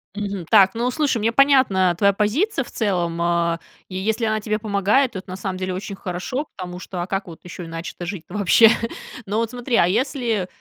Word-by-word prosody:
Мгм. 200 Hz, -4 st, -4 dB
Так, 195 Hz, -3 st, +6 dB
ну, 240 Hz, +2 st, 0 dB
слушай, 275 Hz, -3 st, 0 dB
мне 225 Hz, +2 st, +1 dB
понятна 245 Hz, -10 st, +4 dB
твоя 200 Hz, 0 st, +4 dB
позиция 265 Hz, -, 0 dB
в -, -, -14 dB
целом, 175 Hz, -6 st, -1 dB
а, 170 Hz, -1 st, +1 dB, 0.3 s
и 185 Hz, -, -8 dB
если 220 Hz, +4 st, -1 dB
она 215 Hz, 0 st, 0 dB
тебе 215 Hz, 0 st, -1 dB
помогает, 215 Hz, +5 st, +2 dB
то 190 Hz, -, -5 dB
это 190 Hz, -, -14 dB
на 185 Hz, -, -5 dB
самом 190 Hz, -1 st, -4 dB
деле 185 Hz, 0 st, -3 dB
очень 195 Hz, +1 st, -5 dB
хорошо, 195 Hz, -, -4 dB
потому 180 Hz, -1 st, -6 dB
что, 180 Hz, -1 st, -6 dB
а -, -, -6 dB
как 195 Hz, 0 st, -3 dB
вот 165 Hz, -, -10 dB
ещё 175 Hz, 0 st, -8 dB
иначе-то 165 Hz, +1 st, -6 dB
жить-то 180 Hz, -1 st, -7 dB
вообще? 210 Hz, +2 st, +6 dB, 0.6 s
Но 210 Hz, +2 st, -1 dB
вот 230 Hz, 0 st, 0 dB
смотри, 245 Hz, 0 st, -2 dB
а 170 Hz, -, +5 dB
если, 230 Hz, -2 st, 0 dB
200 Hz, 210 wpm, -22 LUFS, 180-230 Hz, 0.6 s, Так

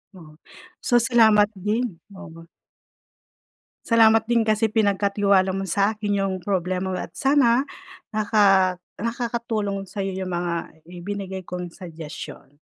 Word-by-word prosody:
Oo. 165 Hz, -4 st, -13 dB, 0.5 s
So 245 Hz, -, 0 dB
salamat 220 Hz, -3 st, +5 dB
din, 210 Hz, 0 st, -2 dB, 0.2 s
oo. 165 Hz, -2 st, -12 dB, 1.4 s
Salamat 225 Hz, -1 st, +5 dB
din 235 Hz, -1 st, +2 dB
kasi 215 Hz, 0 st, +2 dB
pinagkatiwala 200 Hz, -2 st, +2 dB
mo 195 Hz, -, -2 dB
sa 200 Hz, +3 st, +1 dB
akin 205 Hz, -1 st, -1 dB
yung 195 Hz, -1 st, -1 dB
problema 185 Hz, 0 st, -1 dB
mo, 185 Hz, -, -3 dB
at -, -, -8 dB
sana 270 Hz, -3 st, +3 dB, 0.5 s
naka 200 Hz, -4 st, +3 dB, 0.2 s
nakakatulong 230 Hz, -4 st, -3 dB
sa'yo 195 Hz, +1 st, -4 dB
yung 190 Hz, 0 st, -4 dB
mga 170 Hz, -2 st, -4 dB
ibinigay 190 Hz, 0 st, -6 dB
kong 180 Hz, -1 st, -6 dB
suggestion. 155 Hz, -5 st, -10 dB
200 Hz, 120 wpm, -23 LUFS, 185-220 Hz, 1.4 s, salamat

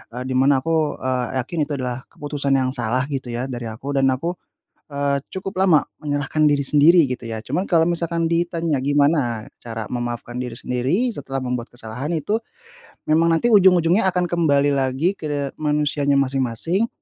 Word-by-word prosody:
Eee, 125 Hz, -, -4 dB
di 130 Hz, 0 st, -4 dB
mana 135 Hz, 0 st, +3 dB
aku, 160 Hz, -2 st, +1 dB
eee, 130 Hz, -1 st, -1 dB, 0.2 s
yakin 165 Hz, +7 st, -5 dB
itu 150 Hz, -, -4 dB
adalah 130 Hz, -1 st, -4 dB
keputusan 145 Hz, -2 st, -2 dB
yang 130 Hz, -1 st, +1 dB
salah 125 Hz, 0 st, -1 dB
gitu 135 Hz, -2 st, -3 dB
ya 120 Hz, +2 st, -2 dB
dari 120 Hz, -2 st, -5 dB
aku, 115 Hz, +6 st, -6 dB
dan 135 Hz, -, +3 dB
aku, 170 Hz, +7 st, -3 dB, 0.6 s
eee, 140 Hz, -1 st, 0 dB
cukup 190 Hz, 0 st, -2 dB
lama 170 Hz, -6 st, +4 dB, 0.2 s
menyalahkan 145 Hz, +1 st, -1 dB
diri 145 Hz, -1 st, +2 dB
sendiri 150 Hz, +3 st, +5 dB
gitu 125 Hz, -1 st, -5 dB
ya. 110 Hz, -1 st, -4 dB
Cuman 180 Hz, -, -1 dB
kalau 165 Hz, -1 st, +4 dB
misalkan 170 Hz, -1 st, 0 dB
ditanya, 165 Hz, -3 st, 0 dB
gimana 140 Hz, -5 st, +1 dB, 0.2 s
cara 115 Hz, -2 st, -5 dB
memaafkan 120 Hz, 0 st, -4 dB
diri 125 Hz, -2 st, -5 dB
sendiri 130 Hz, -, 0 dB
setelah 135 Hz, -1 st, -4 dB
membuat 125 Hz, -2 st, -3 dB
kesalahan 120 Hz, +5 st, -6 dB
itu 160 Hz, +7 st, -1 dB, 0.8 s
memang 165 Hz, +2 st, +4 dB
nanti 165 Hz, +9 st, +2 dB
ujung-ujungnya 185 Hz, -1 st, +5 dB
akan 180 Hz, -1 st, 0 dB
kembali 145 Hz, -4 st, +2 dB
lagi 135 Hz, +7 st, 0 dB
ke 145 Hz, -3 st, -3 dB
manusianya 150 Hz, -1 st, +1 dB
masing-masing. 135 Hz, -, 0 dB
145 Hz, 165 wpm, -21 LUFS, 130-165 Hz, 0.8 s, sendiri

